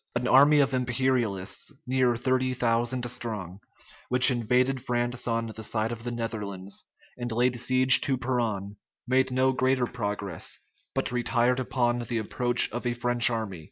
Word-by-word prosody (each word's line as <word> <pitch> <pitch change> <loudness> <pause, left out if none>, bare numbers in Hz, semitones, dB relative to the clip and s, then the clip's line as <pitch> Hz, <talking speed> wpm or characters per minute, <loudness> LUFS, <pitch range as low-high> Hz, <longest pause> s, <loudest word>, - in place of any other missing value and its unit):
An 120 +1 -1
army 145 +3 +6
of 135 -1 0
imperialists, 125 -6 -1
near 125 -1 +1
thirty 130 +1 0
thousand 120 +1 0
strong, 110 -7 -4 0.5
which 125 +1 +8
invaded 125 +2 0
France 120 0 -2
on 115 -1 -1
the 110 - -6
side 110 +1 -1
of 115 -1 -7
the 120 - -3
Netherlands, 105 -5 -5 0.3
and 120 -1 -4
laid 120 +1 0
siege 130 +1 +4
to 135 -2 0
Peronne, 115 -6 -3 0.3
made 130 +1 +2
no 130 +1 +1
greater 130 0 +1
progress, 105 -7 -4 0.4
but - - -1
retired 125 +1 +1
upon 120 -1 -1
the 120 0 -4
approach 120 +3 +1
of 120 +1 -4
a 120 - -1
French 120 0 +3
army. 110 -6 -4
120 Hz, 155 wpm, -26 LUFS, 115-130 Hz, 0.5 s, which